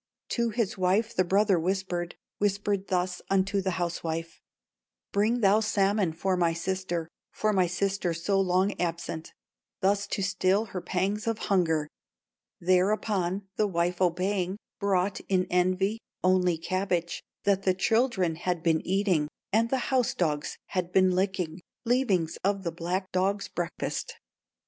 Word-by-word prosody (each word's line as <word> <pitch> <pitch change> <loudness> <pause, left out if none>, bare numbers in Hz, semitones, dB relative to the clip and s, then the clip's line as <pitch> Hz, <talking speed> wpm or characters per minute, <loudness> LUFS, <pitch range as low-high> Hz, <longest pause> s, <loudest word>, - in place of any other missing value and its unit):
"To 235 -1 +1
his 225 -2 -1
wife 200 +5 +2
the 185 - +4
brother 195 0 +3
whispered, 180 -1 -2 0.2
Whispered 200 -1 0
thus 180 -1 -1
unto 195 +1 +2
the 190 -2 -2
housewife: 165 -1 -3 0.7
'Bring 220 +4 +2
thou 200 +1 +5
salmon 200 -3 +2
for 185 +3 0
my 170 -2 +2
sister, 175 -1 -2 0.2
For 215 0 0
my 185 -2 +3
sister 190 0 -1
so 180 +4 +1
long 185 +2 +2
absent, 170 -2 -3 0.5
Thus 200 +1 +1
to 195 - -2
still 195 +2 +2
her 185 - -3
pangs 195 +5 -1
of 225 -1 +1 0.2
hunger.' 160 -5 +2 0.7
"Thereupon 190 +1 +1
the 210 - +3
wife 175 0 -1
obeying, 185 +1 +1 0.2
Brought, 195 -1 +1
in 185 -2 +2
envy, 185 +4 +2 0.2
only 180 -2 +3
cabbage 175 0 -1 0.2
That 200 -1 +2
the 185 -1 +2
children 195 -6 +1
had 175 -1 -2
been 160 -2 +3
eating, 185 -5 +1 0.3
And 225 +2 +3
the 260 0 -1
house 255 -3 +2
dogs 150 -4 -1
had 180 -1 -2
been 185 0 +4
licking, 185 -2 -1 0.2
Leavings 215 -10 +1
of 195 0 +1
the 170 - -2
black 180 +3 -3
dog's 195 +2 0
breakfast. 475 -1 -3
185 Hz, 140 wpm, -28 LUFS, 175-200 Hz, 0.7 s, thou